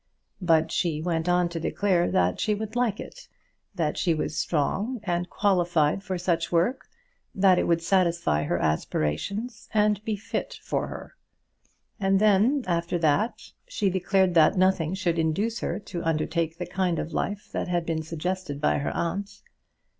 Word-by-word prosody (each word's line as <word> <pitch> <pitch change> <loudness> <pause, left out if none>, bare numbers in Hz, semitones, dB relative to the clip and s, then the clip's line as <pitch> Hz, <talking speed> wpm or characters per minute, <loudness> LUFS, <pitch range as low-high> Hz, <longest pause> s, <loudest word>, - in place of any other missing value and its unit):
But 160 -2 +3
she 160 -4 0
went 165 0 -1
on 175 0 +3
to 170 -1 -4
declare 180 +1 +1
that 90 0 +1
she 210 - +1
would 215 +2 -6
like 240 -4 +1
it, - - -10 0.5
that 160 -4 -1
she 170 -2 +2
was 155 - -3
strong 195 - -1
and 175 -2 -1
qualified 175 -5 +2
for 190 -2 -3
such 170 -2 -1
work, 180 +10 +1 0.5
that 190 -2 +5
it - - 0
would 170 -1 +2
satisfy 170 - +2
her - - 0
aspirations, 80 - -2
and 210 -1 +2
be 220 -2 -1
fit - - -4
for - - -1
her. - - -9 0.8
And 195 -1 +2
then, 215 +7 +3
after 170 0 0
that, 170 +8 0 0.2
she 210 - 0
declared 190 0 +2
that 165 +3 +5
nothing 185 -2 +2
should 175 -3 0
induce 200 +9 0
her 170 - -2
to 180 -4 -6
undertake 165 +1 -1
the 180 - -4
kind 175 -1 -1
of 165 - -4
life 205 0 -3
that - - -2
had 175 -1 0
been 160 -1 -1
suggested 165 -1 -4
by 150 - +2
her 140 - -2
aunt. 195 +4 -3
175 Hz, 165 wpm, -26 LUFS, 165-200 Hz, 0.8 s, that